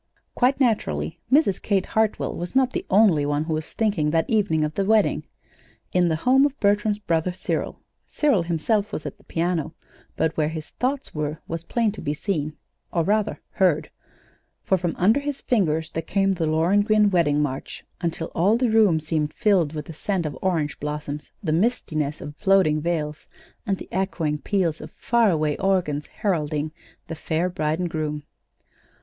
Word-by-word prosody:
Quite 265 +2 +2
naturally, 80 - 0
Mrs. 270 - +3
Kate 195 -3 +1
Hartwell 220 -1 0
was 175 +7 -6
not 260 -1 +3
the - - -3
only 195 -7 +5
one 145 +1 0
who 160 0 -2
was 155 0 -4
thinking 200 -9 +1
that 160 +1 +1
evening 200 -8 +2
of 150 0 -2
the 195 - 0
wedding. 215 +1 +2 0.7
In 180 -1 +3
the 160 - +1
home 255 - +4
of 285 0 0
Bertram's 205 0 +2
brother 170 -3 0
Cyril, 180 - -3 0.3
Cyril 285 - +2
himself 200 +6 0
was 155 - -5
at - - -6
the - - -22
piano, 165 -2 -2 0.4
but 160 - 0
where 155 -1 +1
his 155 -2 -7
thoughts 270 +2 -2
were 150 0 -3
was 165 0 -4
plain 225 +4 0
to 215 - -9
be 145 - -2
seen 155 -4 -2 0.3
or 170 - +1
rather, 210 +3 0
heard; 160 -5 +1 0.7
for 190 - +2
from 175 -2 -2
under 215 +9 +4
his 285 -1 -4
fingers 160 -9 0
there 165 - -2
came 195 +3 +1
the 170 -3 -1
Lohengrin 205 +6 +3
wedding 155 -5 +2
march 135 -3 -3 0.2
until 165 -1 -2
all 200 +7 +3
the 245 -2 +1
room 210 -7 +4
seemed 155 -1 -1
filled 180 -8 +2
with 150 -1 -4
the 165 - -8
scent 180 +2 -2
of 150 - -3
orange 165 -6 -1
blossoms, 150 0 -5
the 160 - 0
mistiness 155 - 0
of 145 +1 -7
floating 190 -7 +3
veils, 155 -2 -2 0.4
and 195 -1 +1
the - - -9
echoing 170 -5 -1
peals 170 0 0
of - - -8
far 235 -2 +2
away 155 -4 +1
organs 175 -7 0
heralding 155 -6 -1 0.4
the 165 - -5
"Fair 160 +2 -1
Bride 155 -3 -1
and 175 -1 -2
Groom." 150 -2 -3
170 Hz, 180 wpm, -24 LUFS, 155-205 Hz, 0.7 s, only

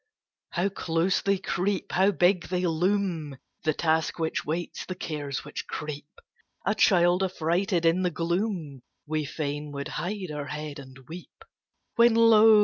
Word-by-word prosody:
How 180 +3 +1
close 175 -1 0
they 200 0 +2
creep! 190 +1 -2
How 190 +2 +4
big 180 -1 +2
they 180 0 -1
loom! 170 -4 0 0.3
The 155 - +3
Task 160 -1 +1
which 160 -1 -1
waits, 170 +3 -3
the 185 - -6
Cares 145 -5 -4
which - - -6
creep; 150 -1 -5 0.6
A - - +2
child, 175 -1 +4
affrighted 175 0 0
in 165 +3 +4
the 180 - +2
gloom, 170 - -2 0.2
We 155 0 -1
fain 145 0 -4
would 140 0 -4
hide 185 -2 -4
our 145 -1 -4
head 150 -1 -5
and 130 -1 -12
weep. 175 - -11 0.5
When, 235 -1 +6
lo! 225 -1 +7
170 Hz, 150 wpm, -27 LUFS, 155-190 Hz, 0.6 s, lo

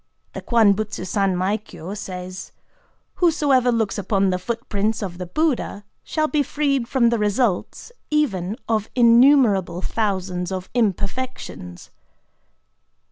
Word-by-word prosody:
The - - -6
KWAN 225 -4 +4
BUTSU 210 -2 -4
SANMAI 195 0 0
KYO 185 -2 -9
says:—"Whosoever 255 - -2
looks 220 -4 -1
upon 195 -1 +1
the 180 - -1
footprints 220 +1 -2
of 180 -2 -6
the 180 - -5
Buddha 260 - -1 0.2
shall 310 -1 -1
be 300 -1 +1
freed 275 -3 0
from 240 -3 +3
the 235 -1 0
results 210 - -1 0.2
even 215 - 0
of 220 -2 0
innumerable 235 -7 +4
thousands 185 -4 -2
of 185 -1 -5
imperfections." 205 - -3
215 Hz, 115 wpm, -22 LUFS, 185-255 Hz, 0.2 s, KWAN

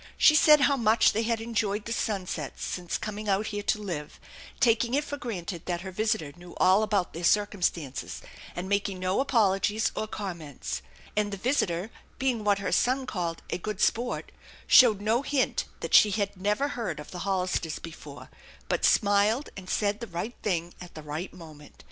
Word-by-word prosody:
She 305 - +7
said 300 -1 +7
how 280 -1 +4
much 220 -1 +4
they 220 - +1
had 230 0 0
enjoyed 215 -2 -1
the 230 - -2
sunsets 185 - -3
since 175 -1 -3
coming 215 0 -5
out 200 +2 +2
here 205 - -2
to 210 - 0
live, 170 -8 -6 0.4
taking 235 0 +3
it 290 - +1
for 290 - -5
granted 190 - -6
that 175 -1 -2
her 190 0 -7
visitor 215 -7 -1
knew 175 0 -13
all 185 +3 +5
about 205 -4 0
their 170 - -6
circumstances, 175 -8 0 0.3
and 175 +1 -4
making 200 -1 0
no 185 +3 0
apologies 215 -5 +2
or 215 - -2
comments; 165 - -5 0.3
and 210 -1 0
the 200 - -4
visitor, 200 -5 0 0.3
being 255 -5 0
what 205 -1 +3
her 200 - -3
son 260 +2 +2
called 175 -7 -3
" - - -30
a - - -2
good 210 +1 -5
sport," 240 +3 0 0.3
showed 220 -6 +7
no 220 +4 +2
hint 280 -1 0 0.2
that - - -5
she 210 - +8
had 200 0 -1
never 210 +9 0
heard 235 - -4
of 150 - -10
the 180 - -6
Hollisters 180 -4 -1
before, 165 -1 -10 0.4
but - - -1
smiled 210 +5 +3
and 185 -1 -9
said 205 0 0
the 235 - -6
right 180 +7 -4
thing 175 -4 -1
at 180 -1 -11
the 155 - -8
right 150 +5 -5
moment. 155 -4 -13
205 Hz, 185 wpm, -28 LUFS, 180-225 Hz, 0.4 s, she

